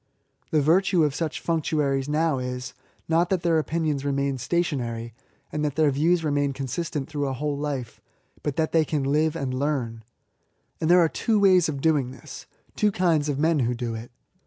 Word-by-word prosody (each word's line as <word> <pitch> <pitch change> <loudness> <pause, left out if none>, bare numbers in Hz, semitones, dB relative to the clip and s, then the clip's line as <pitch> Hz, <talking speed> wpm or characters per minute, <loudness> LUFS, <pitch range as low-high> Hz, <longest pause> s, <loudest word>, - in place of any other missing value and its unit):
The 155 -2 +2
virtue 175 +2 +3
of 150 -2 +1
such 160 +1 -3
functionaries 150 -4 0
now 155 -2 +1
is, 125 0 -5 0.3
not 170 +2 +2
that 185 -3 0
their 165 -2 +3
opinions 155 -2 -1
remain 140 -1 -1
stationary, 120 -8 -2 0.4
and 150 - -2
that 145 -2 -1
their 155 -2 +3
views 165 +5 +2
remain 145 -2 0
consistent 140 +2 -3
through 145 -2 -2
a 135 - -2
whole 145 +3 -2
life, 140 -5 -4 0.4
but 145 -3 -2
that 160 -1 0
they 165 -1 +4
can 150 -2 -2
Uve 155 +3 +1
and 135 -5 -3
learn. 130 -5 -2 0.8
And 160 - 0
there 180 0 +7
are 165 - +5
two 215 +6 0
ways 185 -4 +5
of 140 -3 -4
doing 150 -5 +2
this 130 -1 -11
— - - -37
^two 210 -1 +2
kinds 165 -6 +1
of 140 - -1
men 160 +1 +2
who 125 -1 0
do 120 -1 -3
it. 115 +2 -7
150 Hz, 190 wpm, -25 LUFS, 135-160 Hz, 0.8 s, there